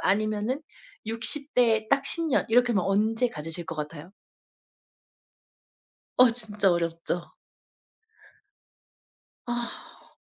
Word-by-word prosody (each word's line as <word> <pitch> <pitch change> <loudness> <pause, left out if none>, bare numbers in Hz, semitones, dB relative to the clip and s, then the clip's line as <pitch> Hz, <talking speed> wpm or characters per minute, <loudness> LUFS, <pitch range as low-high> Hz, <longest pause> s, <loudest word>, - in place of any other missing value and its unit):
아니면은 215 +7 +1 0.4
60 260 +6 -3
대 225 -3 +4
딱 275 0 +3
10 335 -1 -1
년, 275 - +2
이렇게 245 +1 +4
하면 195 -5 +1
언제 220 +5 +2
가지실 165 0 -6
것 165 - -4
같아요? 150 +3 -6 2.1
어 250 0 +8
진짜 210 -4 0
어렵죠. 170 0 -2 2.1
아. 240 0 -6
220 Hz, 165 characters per minute, -27 LUFS, 185-245 Hz, 2.1 s, 어